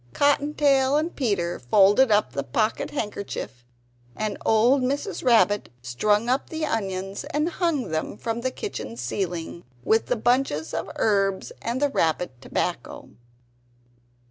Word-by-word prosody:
Cotton 290 Hz, +1 st, +2 dB
tail 275 Hz, -1 st, +3 dB
and 320 Hz, +3 st, -2 dB
Peter 195 Hz, -10 st, -1 dB
folded 205 Hz, -, +4 dB
up 205 Hz, -11 st, +3 dB
the 140 Hz, -, -2 dB
pocket 215 Hz, -, -1 dB
handkerchief, 200 Hz, -, -5 dB, 0.5 s
and 215 Hz, -2 st, -2 dB
old 240 Hz, +5 st, +4 dB
Mrs. 280 Hz, +10 st, -2 dB
Rabbit 220 Hz, -4 st, +3 dB
strung 205 Hz, -, +1 dB
up 255 Hz, +3 st, 0 dB
the 320 Hz, -1 st, -2 dB
onions 195 Hz, -5 st, -3 dB
and 300 Hz, +2 st, -1 dB
hung 335 Hz, -7 st, -1 dB
them 160 Hz, +5 st, -3 dB
from 230 Hz, +1 st, -3 dB
the 260 Hz, -, 0 dB
kitchen 115 Hz, -, -6 dB
ceiling, 170 Hz, +6 st, -4 dB, 0.2 s
with 220 Hz, -, +2 dB
the 250 Hz, -, +1 dB
bunches 240 Hz, -, 0 dB
of -, -, -3 dB
herbs 195 Hz, -3 st, +1 dB
and 235 Hz, +3 st, -2 dB
the 290 Hz, 0 st, +2 dB
rabbit 165 Hz, -, 0 dB
tobacco. -, -, -3 dB
220 Hz, 140 wpm, -24 LUFS, 190-265 Hz, 0.5 s, folded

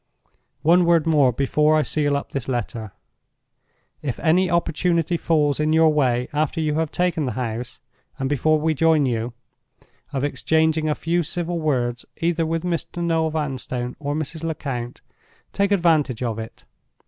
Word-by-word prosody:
"One 175 Hz, +3 st, +5 dB
word 170 Hz, -2 st, +3 dB
more 150 Hz, -6 st, +4 dB
before 150 Hz, +5 st, +2 dB
I 155 Hz, -, +3 dB
seal 145 Hz, +1 st, 0 dB
up 140 Hz, -, -7 dB
this 135 Hz, -4 st, -3 dB
letter. 120 Hz, -4 st, -3 dB, 1.1 s
"If 130 Hz, -5 st, -4 dB
any 180 Hz, +3 st, +3 dB
opportunity 170 Hz, 0 st, +1 dB
falls 150 Hz, -4 st, +1 dB
in 155 Hz, +1 st, +1 dB
your 160 Hz, -1 st, +5 dB
way 125 Hz, -4 st, +1 dB
after 155 Hz, +2 st, 0 dB
you 155 Hz, -2 st, 0 dB
have 160 Hz, 0 st, 0 dB
taken 170 Hz, -5 st, 0 dB
the 125 Hz, -, -2 dB
house, 120 Hz, 0 st, -4 dB, 0.4 s
and 135 Hz, -, -2 dB
before 150 Hz, +3 st, +2 dB
we 160 Hz, +1 st, +1 dB
join 160 Hz, -1 st, +3 dB
you, 115 Hz, -1 st, -2 dB, 0.8 s
of 135 Hz, -2 st, -2 dB
exchanging 160 Hz, +1 st, +1 dB
a 150 Hz, -, +1 dB
few 170 Hz, +2 st, 0 dB
civil 175 Hz, +1 st, -2 dB
words 125 Hz, -6 st, -1 dB
either 165 Hz, -1 st, 0 dB
with 165 Hz, +1 st, -2 dB
Mr. 175 Hz, 0 st, -3 dB
Noel 165 Hz, -1 st, +1 dB
Vanstone 130 Hz, -5 st, -3 dB
or 145 Hz, -1 st, -2 dB
Mrs. 155 Hz, +1 st, -4 dB
Lecount, 135 Hz, -7 st, -4 dB, 0.5 s
take 200 Hz, 0 st, +1 dB
advantage 155 Hz, -, +2 dB
of 115 Hz, -2 st, -2 dB
it. 110 Hz, 0 st, -9 dB
155 Hz, 160 wpm, -22 LUFS, 130-165 Hz, 1.1 s, One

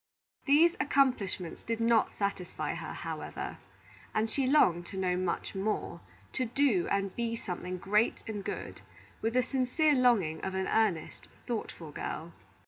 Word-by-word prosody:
These 320 Hz, +5 st, +6 dB
accomplishments 255 Hz, -, +1 dB
did 230 Hz, 0 st, -3 dB
not 230 Hz, -1 st, +3 dB
satisfy 200 Hz, -3 st, -2 dB
her, -, -, -5 dB
however, -, -, -5 dB, 0.6 s
and 220 Hz, +1 st, +1 dB
she 270 Hz, +1 st, +1 dB
longed 175 Hz, -, +4 dB
to 190 Hz, -, -7 dB
know 185 Hz, -1 st, +1 dB
much 180 Hz, -1 st, -2 dB
more, 200 Hz, +3 st, -2 dB, 0.3 s
to 255 Hz, -, 0 dB
do 235 Hz, -6 st, +2 dB
and 195 Hz, -1 st, 0 dB
be 230 Hz, -1 st, -1 dB
something 180 Hz, -3 st, -5 dB
great 210 Hz, +5 st, +1 dB
and 210 Hz, -3 st, -4 dB
good, -, -, -5 dB, 0.4 s
with 225 Hz, +2 st, -1 dB
the 255 Hz, -, +4 dB
sincere 270 Hz, +4 st, +2 dB
longing 230 Hz, -, +3 dB
of 190 Hz, 0 st, -2 dB
an 190 Hz, 0 st, 0 dB
earnest, 215 Hz, -8 st, 0 dB, 0.2 s
thoughtful 210 Hz, -9 st, -4 dB
girl. 165 Hz, +3 st, -5 dB
215 Hz, 145 wpm, -31 LUFS, 185-255 Hz, 0.6 s, These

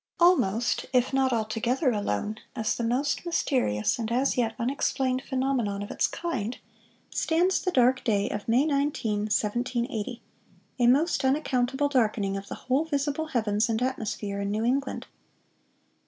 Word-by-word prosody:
"Almost 240 Hz, -, +3 dB
if 250 Hz, +1 st, +2 dB
not 265 Hz, -1 st, +2 dB
altogether 235 Hz, +4 st, 0 dB
alone, 210 Hz, -, -2 dB, 0.2 s
as 220 Hz, -, 0 dB
the 235 Hz, -, -3 dB
most 255 Hz, +5 st, 0 dB
mysterious 255 Hz, -, 0 dB
and 225 Hz, -1 st, -3 dB
as 260 Hz, +3 st, +2 dB
yet 230 Hz, -3 st, 0 dB
unexplained 260 Hz, +1 st, 0 dB
phenomenon 255 Hz, -7 st, -1 dB
of 205 Hz, -, -7 dB
its -, -, +1 dB
kind,... 250 Hz, -9 st, -3 dB, 0.5 s
stands 355 Hz, +4 st, +1 dB
the 370 Hz, -, 0 dB
dark 255 Hz, -4 st, +3 dB
day 205 Hz, -4 st, +1 dB
of 205 Hz, -, -5 dB
May 245 Hz, +5 st, +3 dB
19, 280 Hz, -8 st, 0 dB
1780,—a 240 Hz, +2 st, -3 dB
most 290 Hz, +6 st, +3 dB
unaccountable 265 Hz, 0 st, +1 dB
darkening 215 Hz, -7 st, +1 dB
of 195 Hz, 0 st, -6 dB
the -, -, -6 dB
whole 260 Hz, +4 st, +2 dB
visible 290 Hz, 0 st, -1 dB
heavens 220 Hz, -4 st, 0 dB
and 220 Hz, -1 st, 0 dB
atmosphere 210 Hz, -5 st, -3 dB
in 200 Hz, -, -2 dB
New 215 Hz, +2 st, -1 dB
England." 265 Hz, +2 st, -1 dB
245 Hz, 140 wpm, -27 LUFS, 215-275 Hz, 0.5 s, Almost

